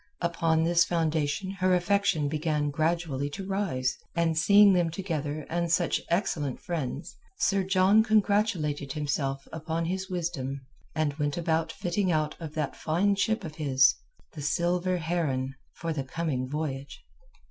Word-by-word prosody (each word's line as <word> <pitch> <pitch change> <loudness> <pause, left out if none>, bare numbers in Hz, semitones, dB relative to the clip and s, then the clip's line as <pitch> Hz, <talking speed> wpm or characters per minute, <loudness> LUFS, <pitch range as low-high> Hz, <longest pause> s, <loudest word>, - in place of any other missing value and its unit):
Upon 165 -2 +1
this 170 +1 +4
foundation 160 +1 0
her 185 -1 +4
affection 180 -4 +2
began 150 -1 -1
gradually 155 -3 0
to 195 +6 -6
rise, 190 -10 -1 0.2
and 165 -1 +1
seeing 200 +4 +6
them 175 -2 +2
together 155 -4 -3
and 170 0 -1
such 170 +1 +2
excellent 160 - -1
friends, 160 -3 -4 0.2
Sir 195 - +2
John 190 +3 +4
congratulated 200 - +1
himself 140 -2 -2
upon 160 +1 -2
his 190 +3 -3
wisdom 160 -7 -3 0.3
and 155 -2 +1
went 145 +1 0
about 160 -1 0
the - - -8
fitting 180 +1 0
out 155 -2 0
of 160 -3 -7
that 150 -3 -2
fine 180 +6 +1
ship 220 +2 0
of 155 -3 -7
his—the 150 - +1
Silver 175 +4 +1
Heron—for 155 -1 -3
the 140 -3 -2
coming 130 -3 -2
voyage. 140 -2 -4
165 Hz, 140 wpm, -28 LUFS, 145-180 Hz, 0.3 s, seeing